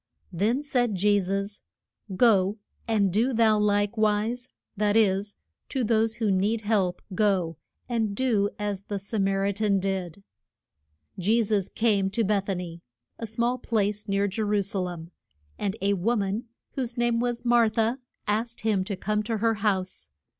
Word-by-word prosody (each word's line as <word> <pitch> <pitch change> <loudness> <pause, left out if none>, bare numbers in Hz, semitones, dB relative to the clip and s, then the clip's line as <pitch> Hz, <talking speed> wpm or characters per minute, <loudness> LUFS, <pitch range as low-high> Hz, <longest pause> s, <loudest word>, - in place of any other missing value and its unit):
Then 220 - +1
said 245 -6 +1
Je 205 +2 +3
sus, 200 +2 -3 0.5
Go, 200 -2 +4 0.3
and 205 -5 +2
do 235 +6 +2
thou 220 -2 +4
like 205 +1 +1
wise; 220 +4 0 0.3
that 210 +1 +2
is, 200 -1 +2 0.3
to 265 - -1
those 225 0 +2
who 220 -4 0
need 205 +4 +1
help 205 -4 0
go 185 -5 +1 0.3
and 225 -4 -1
do 215 -5 +2
as 205 -2 -3
the 205 - -3
Sa 205 +3 -3
mar 195 0 +1
i 200 - +2
tan 200 -1 +1
did. 190 -1 -3 1.0
Je 220 +6 +3
sus 205 -3 0
came 205 -4 +1
to 225 +4 0
Beth 200 -1 0
a 195 - +1
ny 170 -1 -6 0.4
a 230 - -4
small 235 +3 0
place 210 -2 -1
near 200 0 +1
Je 200 +3 -3
ru 205 -1 +1
sa 200 0 -1
lem 175 -2 -5 0.5
and 200 0 -1
a 200 +1 +3
wo 205 +6 +1
man, 205 +3 -1 0.3
whose 250 -3 -3
name 240 -1 +2
was 240 0 -2
Mar 235 -2 +5
tha, 225 +4 0 0.3
asked 225 +3 -1
him 210 -4 +1
to 200 +1 -4
come 210 +3 -1
to 220 +1 -2
her 225 +1 +2
house. 195 -3 -1
210 Hz, 170 wpm, -26 LUFS, 195-225 Hz, 1.0 s, Mar